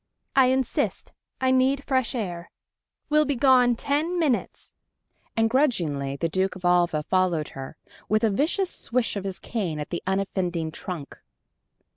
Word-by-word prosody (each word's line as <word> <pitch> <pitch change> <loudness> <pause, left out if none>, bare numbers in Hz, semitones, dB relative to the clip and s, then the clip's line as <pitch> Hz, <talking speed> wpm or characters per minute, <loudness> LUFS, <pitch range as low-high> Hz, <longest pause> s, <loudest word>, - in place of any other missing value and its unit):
"I 265 -2 +6
insist. 260 -1 -1 0.3
I 260 -1 +2
need 260 +2 +2
fresh 260 -3 0
air.... 175 -7 -4 0.6
We'll 305 0 +5
be 285 - 0
gone 250 -1 +5
ten 300 +8 -1
minutes!" 295 -8 -1 0.6
And 225 0 +4
grudgingly 170 - +1
the 165 +4 -1
Duke 190 +3 0
of 185 -1 -8
Alva 175 -3 +3
followed 180 -3 +1
her, 135 +2 -8 0.3
with 215 +1 +2
a 220 - +3
vicious 345 - 0
swish 240 -2 -1
of 200 -1 -4
his 190 -1 -3
cane 180 -10 -3
at 150 - -6
the 170 - -2
unoffending 185 -4 -1
trunk. 160 -4 -7
205 Hz, 150 wpm, -25 LUFS, 175-260 Hz, 0.6 s, I